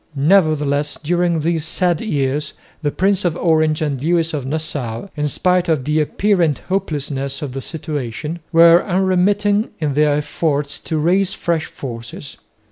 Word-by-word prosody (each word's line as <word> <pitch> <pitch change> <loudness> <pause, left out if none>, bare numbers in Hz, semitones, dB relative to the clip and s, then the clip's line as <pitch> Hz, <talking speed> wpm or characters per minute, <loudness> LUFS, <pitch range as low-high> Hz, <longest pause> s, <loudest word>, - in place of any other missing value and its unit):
Nevertheless 150 -2 +2
during 175 0 +1
these 165 0 0
sad 175 0 0
years 145 -7 -1 0.3
the 150 - 0
Prince 195 +5 +1
of 175 -3 0
Orange 155 -2 +2
and 140 -4 -2
Lewis 165 0 +1
of 140 -4 -3
Nassau, 145 - -4
in 150 -1 -1
spite 180 +4 +1
of 150 -6 +1
the 150 +1 +1
apparent 170 -2 +1
hopelessness 140 -6 -2
of 140 - -4
the 135 - -4
situation, 150 0 -5
were 170 +1 +7
unremitting 195 +3 +1
in 150 -3 -1
their 150 0 +3
efforts 150 -1 -1
to 160 - -1
raise 185 +5 +2
fresh 170 -3 -1
forces. 115 +2 -8
155 Hz, 145 wpm, -19 LUFS, 145-175 Hz, 0.3 s, were